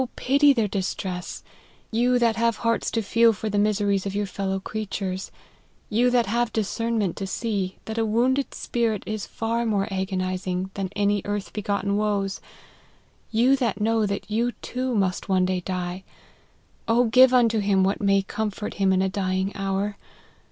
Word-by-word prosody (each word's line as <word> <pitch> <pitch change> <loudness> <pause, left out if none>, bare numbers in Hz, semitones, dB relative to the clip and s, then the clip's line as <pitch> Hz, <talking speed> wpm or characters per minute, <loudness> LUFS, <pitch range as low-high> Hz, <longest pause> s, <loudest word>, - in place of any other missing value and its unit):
pity 280 +2 +4
their 230 -6 +1
distress, 185 -2 -4 0.5
you 245 +2 +3
that 235 -2 +2
have 230 0 +1
hearts 230 0 +1
to 225 - -1
feel 230 +3 +4
for 215 +1 -4
the 205 - +1
miseries 205 -2 +1
of 200 0 -4
your 205 0 0
fellow 195 0 -3
creatures; 195 -2 -4 0.6
you 240 +4 +3
that 245 -1 +3
have 235 +3 0
discernment 220 -2 -1
to 195 - -4
see, 195 -3 -2
that 220 +1 -3
a - - +2
wounded 250 +5 +1
spirit 230 -4 -1
is 215 -1 -4
far 230 +1 -2
more 205 -4 0
agonizing 185 -1 -2
than 195 -2 -3
any 205 0 +1
earth 205 -1 -4
begotten 200 -1 -1
woes; 205 -2 -1 0.9
you 240 +4 +4
that 235 -7 -1
know 225 +1 +2
that 200 0 -4
you 235 +3 0
too 255 -1 -2
must 190 -1 0
one 185 -1 +3
day 185 0 0
die, 180 0 -4 1.1
give 255 +1 +7
unto 230 -3 +4
him 200 -2 +2
what 195 +3 0
may 195 -1 +3
com 215 +2 -2
fort 210 +1 -6
him 195 -1 +2
in 190 0 +3
a - - +2
dying 190 0 -1
hour. 195 +1 -2
205 Hz, 165 wpm, -24 LUFS, 195-230 Hz, 1.1 s, give